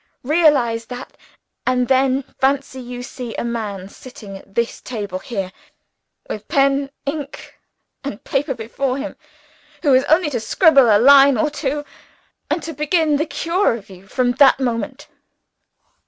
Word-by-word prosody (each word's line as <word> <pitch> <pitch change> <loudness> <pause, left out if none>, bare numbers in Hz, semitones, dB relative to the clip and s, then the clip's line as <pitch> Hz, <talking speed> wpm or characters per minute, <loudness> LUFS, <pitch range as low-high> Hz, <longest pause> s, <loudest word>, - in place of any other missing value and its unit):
Realize 265 -6 +3
that 250 +2 -9 0.5
and 250 -1 +1
then 265 +1 +2 0.2
fancy 265 -1 0
you 245 0 -7
see 245 -2 -7
a - - -3
man 215 -5 -4
sitting 205 -2 -11
at 195 0 -14
this 235 0 -1
table 205 -6 -5
here, 195 -4 -4 0.8
with 210 -1 -6
pen, 275 0 +2 0.2
ink, 285 0 -6 0.4
and 275 -3 -6
paper 270 0 -1
before 255 +4 -3
him, 290 +1 -5 0.7
who 285 -4 +4
has 260 +1 +5
only 315 0 +3
to 245 - -1
scribble 275 - +5
a 210 - +6
line 275 +2 +7
or 295 +7 +1
two, 290 0 -3 0.6
and 335 - -1
to 325 - -5
begin 300 +1 +1
the 310 +3 -1
cure 335 - 0
of 200 -3 -11
you 190 +1 -14
from 245 +4 +1
that 270 +1 +5
moment. 260 +3 -3
260 Hz, 150 wpm, -20 LUFS, 230-285 Hz, 0.8 s, line